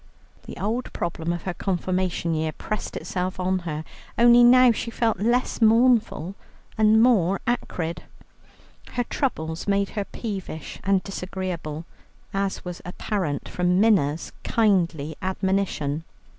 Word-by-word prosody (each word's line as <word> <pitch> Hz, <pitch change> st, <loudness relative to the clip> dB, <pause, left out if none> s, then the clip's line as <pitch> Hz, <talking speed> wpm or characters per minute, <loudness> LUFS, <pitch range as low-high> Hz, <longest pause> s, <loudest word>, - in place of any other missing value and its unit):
The -, -, -8 dB
old 230 Hz, +5 st, -2 dB
problem 170 Hz, -1 st, -2 dB
of 175 Hz, -1 st, -4 dB
her 185 Hz, -, -3 dB
Confirmation 180 Hz, -2 st, -1 dB
year 155 Hz, 0 st, -1 dB
pressed 215 Hz, +7 st, -4 dB
itself 185 Hz, 0 st, -3 dB
on 185 Hz, +1 st, +1 dB
her, 155 Hz, 0 st, -3 dB, 0.3 s
only 240 Hz, +1 st, +7 dB
now 250 Hz, 0 st, +7 dB
she 230 Hz, -, -3 dB
felt 230 Hz, -4 st, 0 dB
less 240 Hz, +4 st, +1 dB
mournful 225 Hz, -6 st, +3 dB, 0.4 s
and 220 Hz, 0 st, +5 dB
more 195 Hz, -6 st, +3 dB
acrid. 175 Hz, -8 st, -2 dB, 0.9 s
Her 245 Hz, -, 0 dB
troubles 160 Hz, -, -3 dB
made 200 Hz, 0 st, +2 dB
her 205 Hz, -2 st, -3 dB
peevish 190 Hz, -, -6 dB
and 195 Hz, -1 st, +2 dB
disagreeable, 180 Hz, -5 st, -5 dB, 0.5 s
as 195 Hz, -1 st, -2 dB
was 180 Hz, -1 st, -6 dB
apparent 180 Hz, -4 st, -3 dB
from 180 Hz, +1 st, +1 dB
Minna's 170 Hz, -9 st, +2 dB
kindly 170 Hz, -9 st, +1 dB
admonition. 190 Hz, -6 st, -1 dB
190 Hz, 125 wpm, -24 LUFS, 170-220 Hz, 0.9 s, only